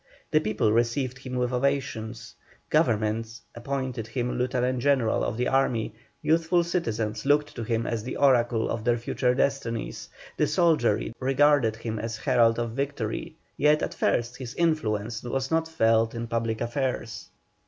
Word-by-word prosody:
The 155 - +5
people 110 -5 +1
received 120 +3 0
him 130 -1 -6
with 125 0 0
ovations; 125 -4 -2 0.4
Government 110 +1 +1
appointed 130 -2 -4
him 125 +1 -2
lieutenant 125 0 0
general 130 -3 +2
of 110 - -2
their 125 - 0
army; 125 -5 +1 0.3
youthful 165 +2 +3
citizens 115 -11 -2
looked 145 +1 +2
to 120 - -5
him 115 0 -1
as 115 -2 -2
the 125 - -5
oracle 120 -4 +3
of 110 - -3
their 120 0 +2
future 125 +1 0
destinies; 135 -4 -2 0.3
the - - +2
soldiery 155 - +2
regarded 135 -3 +3
him 110 -1 -4
as 115 +1 -3
the - - -12
herald 120 -4 +4
of 120 -1 -2
victory; 130 -3 -3 0.2
yet 150 +2 +3
at - - -2
first 120 +1 0
his 125 -2 -7
influence 115 -10 0
was 130 +2 -3
not 160 0 +1
felt 115 -7 +2
in 115 0 -3
public 115 -1 -2
affairs. 120 -2 -3
120 Hz, 155 wpm, -26 LUFS, 115-135 Hz, 0.4 s, The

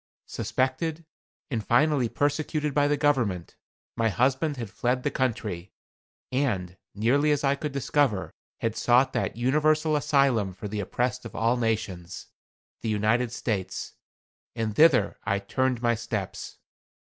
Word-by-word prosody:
Suspected, 155 +5 -2 0.5
and 115 -4 -1
finally 130 +2 +3
persecuted 150 +1 -1
by 145 0 +3
the 145 0 +1
government, 120 - 0 0.4
my 115 -1 +2
husband 130 - +1
had 115 -5 -5
fled 125 +4 -1
the 145 - 0
country, 105 -8 -2 0.6
and, 105 -10 -1 0.2
nearly 130 +8 +2
as 145 -1 +1
I 135 0 +3
could 145 +1 -4
discover, 135 -6 0 0.3
had 115 -1 -1
sought 125 +2 +3
that - - -2
universal 155 +5 +2
asylum 135 -9 +2
for 95 +3 -7
the 105 +1 -4
oppressed 125 +5 -1
of 115 - -9
all 115 +2 +2
nations 110 -7 -3 0.5
the 115 - -2
United 110 +3 +1
States. 105 -6 -3 0.6
And 110 -2 -2
thither 135 -10 +4
I 100 - +1
turned 125 +4 -1
my 120 0 +3
steps. 110 -4 -5
125 Hz, 135 wpm, -27 LUFS, 110-140 Hz, 0.6 s, thither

